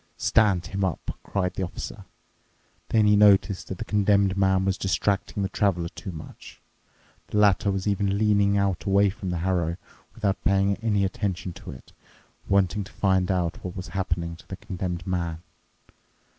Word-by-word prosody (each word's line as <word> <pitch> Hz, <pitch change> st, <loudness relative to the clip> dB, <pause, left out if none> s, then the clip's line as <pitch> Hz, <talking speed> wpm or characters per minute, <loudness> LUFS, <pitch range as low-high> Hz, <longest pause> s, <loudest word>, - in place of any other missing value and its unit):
"Stand 100 Hz, -6 st, +3 dB
him 100 Hz, 0 st, -3 dB
up," 90 Hz, -5 st, -2 dB
cried 90 Hz, -2 st, -2 dB
the -, -, -4 dB
Officer. 90 Hz, -, -6 dB, 0.8 s
Then 110 Hz, -2 st, +3 dB
he 105 Hz, 0 st, +5 dB
noticed 100 Hz, -1 st, +4 dB
that 95 Hz, -, -5 dB
the -, -, -5 dB
Condemned 100 Hz, -2 st, +2 dB
Man 95 Hz, -1 st, +2 dB
was 95 Hz, -1 st, +1 dB
distracting 100 Hz, +1 st, 0 dB
the 95 Hz, -, -1 dB
Traveler 90 Hz, -6 st, 0 dB
too 85 Hz, +2 st, -8 dB
much. 80 Hz, -2 st, -11 dB, 0.7 s
The -, -, -3 dB
latter 100 Hz, -1 st, +4 dB
was 95 Hz, -1 st, -2 dB
even 100 Hz, -1 st, +1 dB
leaning 100 Hz, -1 st, +3 dB
out 100 Hz, -2 st, 0 dB
away 100 Hz, 0 st, +4 dB
from 100 Hz, -2 st, -6 dB
the 90 Hz, -, -1 dB
harrow, 85 Hz, -3 st, 0 dB, 0.4 s
without 100 Hz, -4 st, -1 dB
paying 100 Hz, 0 st, +2 dB
any 105 Hz, -3 st, +1 dB
attention 95 Hz, -4 st, -3 dB
to 100 Hz, +3 st, -11 dB
it, 65 Hz, -, -11 dB, 0.6 s
wanting 100 Hz, +1 st, +2 dB
to -, -, -14 dB
find 95 Hz, -2 st, +1 dB
out 90 Hz, -3 st, -1 dB
what 90 Hz, -1 st, -6 dB
was 95 Hz, -1 st, -6 dB
happening 85 Hz, -2 st, -2 dB
to -, -, -18 dB
the 95 Hz, -, -6 dB
Condemned 90 Hz, -4 st, -5 dB
Man. 85 Hz, -3 st, -3 dB
95 Hz, 170 wpm, -25 LUFS, 90-100 Hz, 0.8 s, he